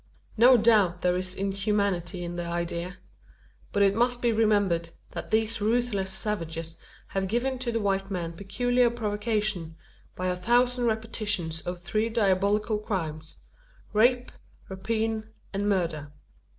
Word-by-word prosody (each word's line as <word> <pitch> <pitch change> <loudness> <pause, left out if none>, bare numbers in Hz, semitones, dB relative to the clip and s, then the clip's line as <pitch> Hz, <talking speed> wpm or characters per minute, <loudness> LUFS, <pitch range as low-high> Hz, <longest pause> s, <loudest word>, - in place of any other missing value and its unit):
No 245 +3 +7
doubt 210 -6 +3
there 180 0 +3
is 185 0 -3
inhumanity 195 -3 -1
in 175 0 -5
the 175 0 -3
idea. 170 +1 -3 0.7
But 200 - +3
it 195 0 +4
must 240 +3 +2
be 240 -1 +2
remembered, 205 -7 +2 0.2
that - - -6
these 220 0 +1
ruthless 215 -3 +1
savages 165 -5 -3 0.3
have 195 0 -1
given 250 +5 -1
to 245 -2 -1
the 230 - 0
white 195 -2 0
man 170 -4 -3
peculiar 245 +7 +1
provocation, 210 -6 -2 0.4
by 185 - -4
a 180 0 +1
thousand 245 +5 +2
repetitions 215 -7 -1
of 180 0 -3
three 215 +5 -1
diabolical 210 0 +1
crimes 160 -7 -4 0.6
rape, 245 +3 +3 0.4
rapine, 220 +3 -2 0.2
and 200 +1 0
murder. 165 -7 -1
205 Hz, 135 wpm, -27 LUFS, 180-225 Hz, 0.7 s, No